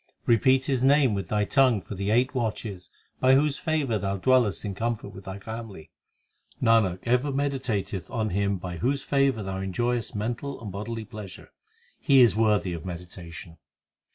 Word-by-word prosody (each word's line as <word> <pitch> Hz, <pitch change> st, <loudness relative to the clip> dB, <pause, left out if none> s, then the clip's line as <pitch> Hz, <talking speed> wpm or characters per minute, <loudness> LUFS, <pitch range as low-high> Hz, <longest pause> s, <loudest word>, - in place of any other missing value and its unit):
Repeat 130 Hz, +3 st, +4 dB
His 130 Hz, -3 st, 0 dB
name 135 Hz, -3 st, +4 dB
with 100 Hz, -1 st, -3 dB
thy 105 Hz, -1 st, 0 dB
tongue 130 Hz, -4 st, +3 dB
for 100 Hz, -, -9 dB
the 100 Hz, +1 st, -3 dB
eight 125 Hz, +4 st, +2 dB
watches 105 Hz, -6 st, -3 dB, 0.3 s
By 130 Hz, 0 st, +5 dB
whose 145 Hz, +1 st, +2 dB
favour 150 Hz, -, 0 dB
thou 100 Hz, 0 st, -2 dB
dwellest 120 Hz, -1 st, +2 dB
in 100 Hz, -, -3 dB
comfort 115 Hz, +1 st, -3 dB
with 95 Hz, 0 st, -12 dB
thy 95 Hz, 0 st, -6 dB
family. 105 Hz, -6 st, -8 dB, 0.7 s
Nanak 110 Hz, -6 st, +3 dB
ever 125 Hz, +4 st, +1 dB
meditateth 125 Hz, -, -2 dB
on 110 Hz, -2 st, -2 dB
Him 100 Hz, +1 st, 0 dB
By 90 Hz, -1 st, -6 dB
whose 135 Hz, +7 st, 0 dB
favour 135 Hz, -5 st, +1 dB
thou 95 Hz, 0 st, -4 dB
enjoyest 120 Hz, +5 st, -2 dB
mental 120 Hz, +6 st, -3 dB
and 105 Hz, -4 st, -7 dB
bodily 110 Hz, +3 st, -5 dB
plea 105 Hz, -2 st, -8 dB
sure; -, -, -13 dB, 0.5 s
He 135 Hz, -2 st, +5 dB
is 110 Hz, -6 st, +4 dB
worthy 105 Hz, -4 st, +2 dB
of 85 Hz, -1 st, -6 dB
meditation. 85 Hz, -1 st, -9 dB
110 Hz, 170 wpm, -26 LUFS, 95-130 Hz, 0.7 s, By